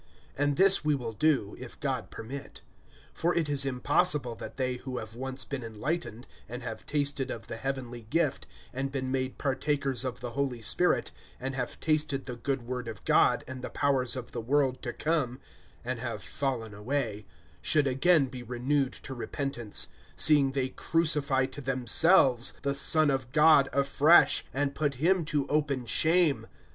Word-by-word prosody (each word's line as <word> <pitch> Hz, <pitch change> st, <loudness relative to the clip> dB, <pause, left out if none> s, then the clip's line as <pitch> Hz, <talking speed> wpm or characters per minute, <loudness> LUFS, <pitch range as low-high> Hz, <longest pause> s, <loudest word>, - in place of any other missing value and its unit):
(3)And 145 Hz, 0 st, +2 dB
this 195 Hz, +1 st, +4 dB
we 150 Hz, -1 st, +2 dB
will 120 Hz, -4 st, -5 dB
do[6:3], 130 Hz, -5 st, +1 dB
if 125 Hz, -1 st, -10 dB
God 130 Hz, -4 st, -3 dB
permit. 135 Hz, +5 st, -8 dB, 0.5 s
(4)For 170 Hz, +1 st, 0 dB
it 165 Hz, -3 st, +1 dB
is 140 Hz, -1 st, 0 dB
impossible 135 Hz, 0 st, +1 dB
that -, -, -9 dB
they 130 Hz, -2 st, -1 dB
who 125 Hz, 0 st, -6 dB
have 110 Hz, -1 st, -7 dB
once 130 Hz, +2 st, -4 dB
been 140 Hz, -3 st, -5 dB
enlightened, 115 Hz, +2 st, -4 dB, 0.2 s
and 120 Hz, +1 st, -7 dB
have 115 Hz, -2 st, -7 dB
tasted 145 Hz, -2 st, 0 dB
of 115 Hz, -, -6 dB
the -, -, -7 dB
heavenly 125 Hz, -2 st, -4 dB
gift, 160 Hz, 0 st, 0 dB, 0.3 s
and 135 Hz, +1 st, -3 dB
been 130 Hz, -2 st, -3 dB
made 130 Hz, -1 st, -2 dB
partakers 140 Hz, -2 st, 0 dB
of 130 Hz, -2 st, -4 dB
the 125 Hz, -1 st, -6 dB
Holy 135 Hz, -2 st, -2 dB
Spirit, 110 Hz, -, +1 dB, 0.3 s
(5)and 135 Hz, +1 st, -4 dB
have 125 Hz, -2 st, -4 dB
tasted 155 Hz, -3 st, 0 dB
the 125 Hz, -, -6 dB
good 125 Hz, +2 st, -3 dB
word 125 Hz, 0 st, -5 dB
of 110 Hz, -3 st, -8 dB
God, -, -, +3 dB
and 130 Hz, 0 st, -7 dB
the -, -, -5 dB
powers 135 Hz, -3 st, +1 dB
of 125 Hz, -2 st, -7 dB
the -, -, -4 dB
world 130 Hz, +2 st, +1 dB
to 120 Hz, -, -3 dB
come, 140 Hz, -4 st, -1 dB, 0.5 s
(6)and 125 Hz, -1 st, -3 dB
have 115 Hz, -5 st, -5 dB
fallen 120 Hz, -2 st, -3 dB
away, 105 Hz, -2 st, -3 dB, 0.3 s
should 150 Hz, -2 st, +3 dB
again 140 Hz, +3 st, +3 dB
be 125 Hz, -1 st, -8 dB
renewed 125 Hz, +3 st, -1 dB
to 135 Hz, -, -7 dB
repentance; 120 Hz, -3 st, -3 dB, 0.3 s
seeing 145 Hz, -3 st, +4 dB
they 130 Hz, -1 st, -1 dB
crucify 145 Hz, -6 st, +1 dB
to 145 Hz, +2 st, -8 dB
themselves 130 Hz, 0 st, +4 dB
the 140 Hz, -1 st, 0 dB
Son 145 Hz, +2 st, +3 dB
of 130 Hz, -2 st, -3 dB
God 150 Hz, -2 st, +5 dB
afresh, 140 Hz, +4 st, +4 dB
and 140 Hz, +1 st, -1 dB
put 145 Hz, -3 st, -1 dB
him 170 Hz, +6 st, +2 dB
to 150 Hz, -3 st, 0 dB
open 140 Hz, -4 st, 0 dB
shame. 160 Hz, +5 st, +2 dB
135 Hz, 170 wpm, -29 LUFS, 125-145 Hz, 0.5 s, God